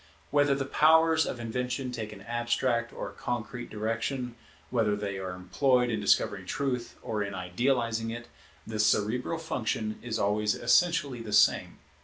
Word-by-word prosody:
Whether 145 -1 +4
the 135 0 -2
powers 160 +2 +4
of 120 - -4
invention 125 +2 -3
take 110 -3 -5
an 100 -2 -11
abstract 120 +1 0
or - - -5
a - - -14
concrete 120 0 -4
direction, 115 +4 -2 0.4
whether 110 -4 +2
they 100 -2 -4
are 95 -1 -4
employed 125 +6 +2
in 110 - -1
discovering 95 -1 +2
truth 135 -2 -2
or 110 -2 -2
in 100 -1 -3
idealizing 115 +4 0
it, 120 +1 -6 0.4
the 110 -1 -5
cerebral 110 +8 +1
function 110 -8 -2
is 115 -2 -3
always 105 0 +1
essentially 135 0 +2
the 110 -2 -6
same. - - +4
120 Hz, 155 wpm, -29 LUFS, 105-125 Hz, 0.4 s, Whether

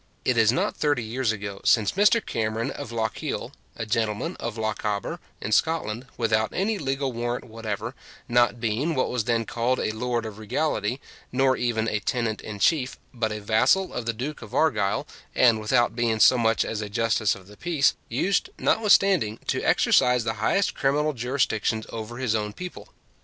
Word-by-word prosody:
It 125 - +2
is 115 -1 +5
not 130 - 0
thirty 145 -5 +1
years 115 +1 -1
ago 100 -2 -6
since 105 -4 +4
Mr 210 +3 +3
Cameron 110 0 -2
of 115 - -7
Lochiel, 110 -2 -3 0.2
a 115 - -4
gentleman 110 - -1
of 115 -1 -4
Lochaber 105 -2 -2 0.2
in 105 - -4
Scotland, 130 -4 0
without 110 -2 +1
any 205 +2 0
legal 135 -2 -2
warrant 120 +1 -2
whatever, 110 0 -5 0.3
not 120 0 +3
being 120 +8 -1
what 130 - 0
was 125 -4 -1
then 115 -1 +1
called 120 +3 0
a - - 0
lord 120 +1 -2
of 110 -1 -7
regality, 110 +1 -1 0.3
nor 130 +1 +3
even 115 -2 0
a 105 - 0
tenant 115 0 -2
in 105 -1 -7
chief, 135 +3 +1 0.2
but 115 -3 -1
a 105 - -4
vassal 110 - +2
of 120 -2 -4
the 115 - +1
Duke 135 +7 -5
of 110 - -9
Argyll, 105 - +1 0.3
and 115 -3 +5
with 105 0 -4
out 120 -2 +3
being 115 -2 0
so 130 - +7
much 115 -2 +2
as 110 - -3
a 105 - -5
justice 110 -1 +1
of 95 +2 -14
peace, 165 -6 +2 0.2
used, 180 +12 0
notwithstanding, 195 - +3
to - - -1
exercise 125 -1 +3
the 110 -1 -1
highest 195 - +2
criminal 150 +2 +1
jurisdictions 115 -3 0
over 115 +1 -6
his 125 -4 0
own 105 -1 -1
people. 180 +7 -8
115 Hz, 180 wpm, -25 LUFS, 110-130 Hz, 0.3 s, so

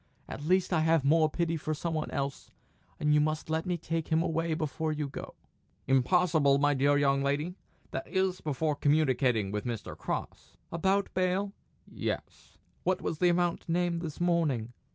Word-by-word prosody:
At 145 - -7
least 185 +3 +2
I 165 - +3
have 160 -2 +3
more 155 +2 +4
pity 165 +1 -1
for 155 0 -3
some 165 +2 -3
one 155 -1 -2
else, 140 -2 -4 0.5
and 150 0 +2
you 150 - +5
must 155 +1 -1
let 160 +3 -1
me 180 -1 0
take 165 0 -3
him 160 0 +2
away 165 -1 0
before 155 0 -2
you 150 -1 -2
go." 140 - -8 0.5
"Impossible, 140 +2 +3
my 145 +1 +3
dear 140 +1 +3
young 140 -1 +3
lady 145 +5 0 0.4
that - - -4
is, 190 -1 0
before 150 +1 -1
communicating 130 -8 +2
with 105 0 -2
Mr. 120 -3 -5
Cross." - - -5
"About 190 +4 +1
bail?" 185 +2 0 0.3
"Yes." - - -5 0.3
"What 185 0 0
was 155 - -2
the 180 - +4
amount 175 -1 0
named 170 0 +1
this 160 -4 -6
morning?" 155 -10 +1
155 Hz, 175 wpm, -30 LUFS, 140-175 Hz, 0.5 s, you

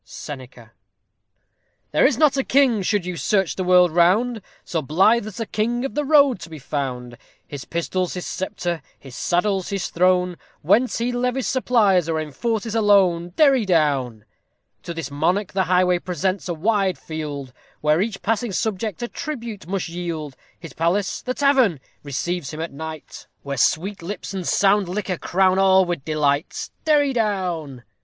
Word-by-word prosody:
SENECA. 125 -5 -10 1.2
There - - +5
is - - 0
not 300 -3 +4
a 270 - +1
king, 260 -6 +3
should 195 -1 0
you 180 -1 -4
search 195 -1 +1
the 190 - -2
world 180 -1 +5
round, 205 +8 +2 0.2
So 165 - -2
blithe 195 - +3
as 215 - -9
the 225 - -2
king 235 +4 -1
of 270 - -4
the 295 - -1
road 280 -6 +4
to 170 - -9
be 160 - -8
found; 125 -4 -5 0.3
His 140 -3 -8
pistol's 180 +2 -2
his 180 - -5
sceptre, 175 -3 -3 0.2
his 135 -2 -12
saddle's 190 +6 0
his 195 -3 -2
throne, 180 0 +2 0.3
Whence 220 +10 +3
he 235 +2 -1
levies 250 -1 -1
supplies, 210 - +2
or 160 -1 0
enforces 215 - -3
a 225 - +1
loan. 180 -4 +3
Derry 275 -6 +4
down. 140 - 0 0.6
To 170 - -7
this 165 -4 -5
monarch 175 +7 0
the 190 -1 +1
highway 180 -1 +3
presents 185 +1 -2
a 175 - -1
wide 195 +1 +1
field, 145 -5 -6 0.3
Where 150 +3 +3
each 205 -1 -3
passing 225 0 -1
subject 215 +1 -2
a - - -1
tribute 235 - -6
must 190 0 -2
yield; 165 -4 -5 0.2
His 165 -2 -10
palace 175 +5 0
the 255 0 -3
tavern! 265 - +3 0.2
receives 150 +2 -3
him 155 - -7
at 165 -2 -4
night, 160 +1 -8 0.2
Where 140 0 -4
sweet 185 +9 0
lips 195 +3 -6
and 185 -3 -4
sound 200 -2 +3
liquor 185 -2 -3
crown 190 +1 +2
all 190 -1 +5
with 175 -6 -3
delight. 150 0 -1 0.2
_Derry 290 -3 +3
down. 180 - -2
185 Hz, 165 wpm, -22 LUFS, 160-215 Hz, 1.2 s, There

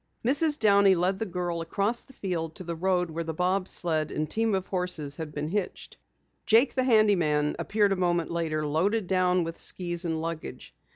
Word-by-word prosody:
Mrs. 295 +4 +2
Downey 200 -4 +5
led 185 +2 0
the 220 - -2
girl 175 -2 -3
across 200 +8 -1
the 265 - -18
field 165 -7 -4
to - - -7
the 170 -1 -4
road 180 0 0
where 165 +1 -3
the 160 -1 -5
bob 185 +2 0
sled 155 -5 +1
and 155 0 -2
team 225 +4 0
of 190 -1 -2
horses 180 -7 -2
had 160 -2 -6
been 150 +1 -4
hitched. 200 +1 -4 0.5
Jake, 230 +4 +4
the 255 -1 0
handy 215 -4 +5
man, 150 -3 0
appeared 205 -1 +1
a - - +2
moment 175 -2 0
later, 160 -2 -1
loaded 190 +8 0
down 180 -1 +2
with 165 0 -6
skis 175 -1 -2
and 160 -2 -2
luggage. 165 0 -6
180 Hz, 195 wpm, -27 LUFS, 165-200 Hz, 0.5 s, Downey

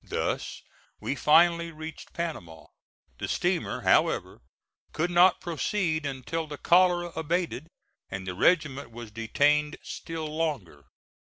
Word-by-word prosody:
Thus - - -3 0.4
we - - -2
finally 170 +3 +4
reached 155 0 -9
Panama. 90 - -5 0.5
The - - -3
steamer, - - -1
however, - - +2 0.5
could 175 +3 -1
not 175 +1 +5
proceed 165 -2 -1
until 140 +4 -4
the 145 -1 -7
cholera 175 0 +3
abated, 160 -2 -2 0.4
and 95 -1 -5
the 90 - -4
regiment 145 - +2
was 115 -1 -10
detained 145 +7 +1
still 165 -1 -6
longer. 150 - -3
155 Hz, 115 wpm, -27 LUFS, 130-170 Hz, 0.5 s, not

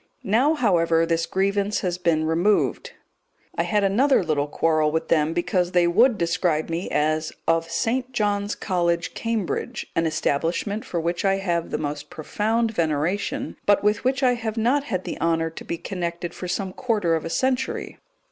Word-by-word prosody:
Now, 255 +10 +3
however, 170 - +2
this 165 0 0
grievance 200 +2 0
has 180 -2 -2
been 165 -3 +1
removed. 170 +6 +1 0.6
I - - +1
had 210 -1 +1
another 235 +5 +3
little 150 -3 0
quarrel 155 0 +1
with 160 +1 -2
them 155 -1 +3
because 180 +1 0
they 175 -1 +4
would 220 +7 +4
describe 170 -2 0
me 170 +3 -3
as 155 +1 0 0.2
"of 165 0 +1
St. 250 +9 -1
John's 205 -3 0
College, 170 -3 -1
Cambridge," 225 -5 -3
an 165 0 +2
establishment 165 +7 -1
for 175 - -3
which 170 +1 -2
I 195 -1 +3
have 175 -4 -1
the - - -2
most 145 -1 -4
profound 220 +8 -1
veneration, 165 +1 -1
but 205 0 +4
with 210 0 +1
which 265 +2 0
I 250 -1 +5
have 230 -2 -4
not 260 +6 +2
had 185 -9 -2
the - - -6
honour 165 -1 +1
to - - -9
be 170 - -4
connected 175 -1 -4
for 180 - -6
some 185 +1 -3
quarter 210 -9 0
of 160 - 0
a 165 - -4
century. 260 +6 -1
180 Hz, 175 wpm, -24 LUFS, 165-210 Hz, 0.6 s, I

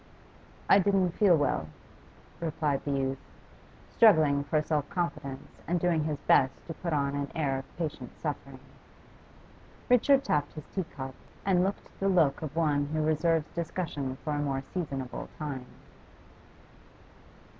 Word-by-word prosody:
'I 195 - +7
didn't 195 -2 +2
feel 180 -1 +4
well,' 80 - 0 0.7
replied 155 -4 -1
the 145 - -2
youth, 135 -1 -1 0.8
struggling 155 -10 +6
for 150 +2 +1
self 150 -1 -1
confidence 145 -5 -4
and 175 +1 +1
doing 165 -3 +1
his 155 -2 -1
best 135 -1 +4
to 165 - -5
put 170 +2 -4
on 140 -2 +1
an 140 0 -2
air 135 -4 0
of 135 - -13
patient 165 -3 -4
suffering. - - -4 1.3
Richard 265 +3 +5
tapped 145 -1 0
his 155 - -8
tea 190 -3 -1
cup 135 -3 -7 0.3
and 180 -2 +3
looked 195 +2 -2
the 195 - +2
look 160 -7 +3
of 155 -2 -5
one 145 -3 +2
who 155 +1 -1
reserves 155 0 +1
discussion 155 -6 -3
for 150 - -1
a 145 - -1
more 140 -2 -1
seasonable 135 -8 -4
time. 135 -5 -5
155 Hz, 145 wpm, -29 LUFS, 140-170 Hz, 1.3 s, I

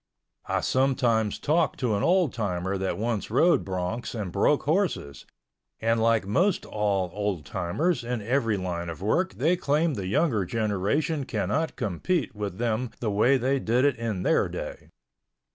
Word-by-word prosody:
I - - 0
sometimes 125 -5 +1
talk 160 +3 +1
to 125 -5 0
an 100 - -1
old 175 - +3
timer 95 -3 -2
that 95 -2 -2
once 110 0 -2
rode 165 +10 +3
broncs 95 +6 -3
and 95 -4 -4
broke 100 +10 +2
horses, 155 - -1 0.5
and 115 0 +1
like 115 -2 +3
most 175 - +1
all 100 -4 -1
old 100 -6 -2
timers 120 - -1
in 120 0 -2
every 115 -1 0
line 85 -2 -3
of 85 +3 -7
work 180 - +1
they 160 +8 +2
claim 155 -1 +1
the 100 -6 -4
younger 120 - +1
generation 110 - 0
cannot 160 +4 -1
compete 125 - -1
with 105 -3 -5
them 120 +1 -1
the 110 -3 -1
way 120 +7 +4
they 130 +2 +1
did 125 +3 +2
it 140 -4 +2
in 110 -5 -3
their - - +2
day. - - -7
115 Hz, 160 wpm, -26 LUFS, 100-140 Hz, 0.5 s, way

